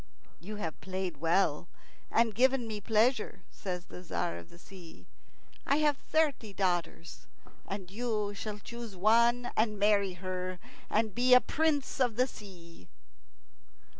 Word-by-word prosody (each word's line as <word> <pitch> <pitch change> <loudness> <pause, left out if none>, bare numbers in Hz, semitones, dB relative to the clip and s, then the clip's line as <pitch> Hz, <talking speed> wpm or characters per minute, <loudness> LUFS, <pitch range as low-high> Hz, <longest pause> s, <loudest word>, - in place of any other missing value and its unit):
"You 200 +7 -7
have 165 -7 -5
played 185 -3 -4
well 165 +1 +1 0.4
and 225 -1 +2
given 255 +2 +3
me 215 -2 -5
pleasure," 220 -2 +1
says 180 -2 -5
the - - -10
Tzar 160 - -2
of 85 - -14
the - - -15
Sea. 175 -2 -13 0.6
"I 280 - +2
have 300 -1 +3
thirty 285 -10 0
daughters, 175 -3 -2 0.4
and 190 -2 -6
you 210 -2 -2
shall 210 +1 -5
choose 235 -1 -8
one 235 +5 +3
and 215 -1 +1
marry 200 -2 +3
her, 185 0 -4 0.3
and 220 -1 +1
be 250 +3 +5
a - - +9
Prince 295 -1 0
of 245 -4 +2
the 250 +2 +3
Sea." 175 - -12
205 Hz, 140 wpm, -31 LUFS, 185-235 Hz, 0.6 s, a